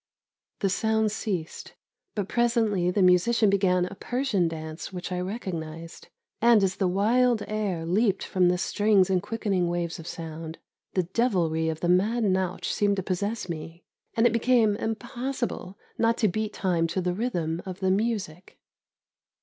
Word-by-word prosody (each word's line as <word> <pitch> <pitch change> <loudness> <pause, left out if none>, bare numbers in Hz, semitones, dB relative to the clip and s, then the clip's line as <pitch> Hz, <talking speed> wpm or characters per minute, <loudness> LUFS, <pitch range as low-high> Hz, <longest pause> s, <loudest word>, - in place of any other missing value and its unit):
The 195 - +2
sounds 220 +1 +1
ceased, 180 -7 -4 0.4
but 205 -3 -2
presently 225 -6 +1
the 190 +1 +2
musician 195 +4 +4
began 185 -2 +2
a 180 - -7
Persian 240 -4 0
dance 160 +1 -6
which 180 0 -6
I 180 - -1
recognised; 170 -5 -6 0.3
and 230 -3 +6
as 190 -1 0
the 190 - +1
wild 225 +5 +2
air 200 -6 -2
leaped 195 +3 +1
from 180 -2 +2
the 180 - +2
strings 200 0 +2
in 185 -1 +2
quickening 200 -5 -1
waves 170 -1 -2
of 165 - -9
sound, 160 0 -7 0.4
the 185 - +3
devilry 175 -5 +1
of 160 0 -4
the 175 - 0
mad 210 +7 +2
nautch 185 -2 0
seemed 205 -1 +2
to 190 - -3
possess 200 +3 -2
me, 165 0 -7 0.3
and 225 - +4
it 235 - +4
became 230 -3 +3
impossible 230 -2 -4 0.2
not 230 0 +3
to 215 - +3
beat 215 +2 -2
time 175 -5 0
to 170 +3 -2
the 180 -1 0
rhythm 175 -7 -2
of 185 -1 -6
the 190 -1 +1
music. 195 -5 -2
190 Hz, 160 wpm, -26 LUFS, 175-220 Hz, 0.4 s, and